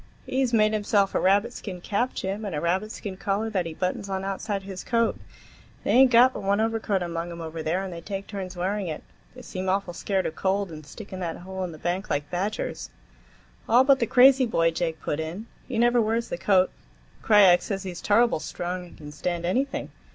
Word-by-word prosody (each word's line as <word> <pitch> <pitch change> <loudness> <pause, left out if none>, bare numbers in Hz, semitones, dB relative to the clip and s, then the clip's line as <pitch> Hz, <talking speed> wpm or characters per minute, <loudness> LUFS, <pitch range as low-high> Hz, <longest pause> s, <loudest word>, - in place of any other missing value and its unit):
"He's 260 -2 0
made 215 -2 +3
himself 205 -2 +2
a - - +2
rabbit 205 +5 +3
skin 185 -6 -7
cap, 210 +8 -1
Jim, 195 +3 -3
and 200 -6 -4
a - - -1
rabbit 185 +6 0
skin 195 -4 -6
collar 205 +3 -1
that 185 -5 0
he 160 - -7
buttons 185 +3 -2
on 190 0 -2
outside 195 +1 -3
his 190 -1 -7
coat. 230 -1 +1 0.7
They - - 0
ain't 260 +1 +7
got 250 +2 +6
but - - -6
one 200 +1 +1
overcoat 220 -4 0
among 170 0 -4
'em 170 - -8
over 160 0 -5
there, 170 +5 -1
and 190 -2 -5
they 170 - -7
take 195 +2 -5
turns 190 -3 -6
wearing 190 +2 -1
it. 155 -2 -5 0.3
They 255 - -11
seem 185 -1 -4
awful 190 -2 0
scared 190 +2 -1
of - - -2
cold, 195 0 0
and 155 -2 -10
stick 205 +6 -10
in 185 - -5
that 170 -3 -3
hole 190 +1 -6
in 180 - -4
the 155 - -10
bank 180 +5 -2
like 145 0 -2
badgers." 195 +4 -3 0.8
"All 245 +3 +6
but 270 0 +4
the 235 - +1
crazy 260 +1 +6
boy," 165 -7 +2
Jake 165 -1 -2
put 150 - -3
in. 165 +7 -5 0.2
"He 250 - -3
never 240 +1 +4
wears 225 +2 0
the - - -3
coat. 185 -1 +3 0.5
Krajiek 195 -5 +6
says 195 -1 -4
he's 180 -2 -6
turrible 230 -3 +3
strong 180 +2 -5
and - - -16
can 150 -1 -10
stand 170 +3 -3
anything. 265 +10 -1
195 Hz, 220 wpm, -26 LUFS, 175-220 Hz, 0.8 s, ain't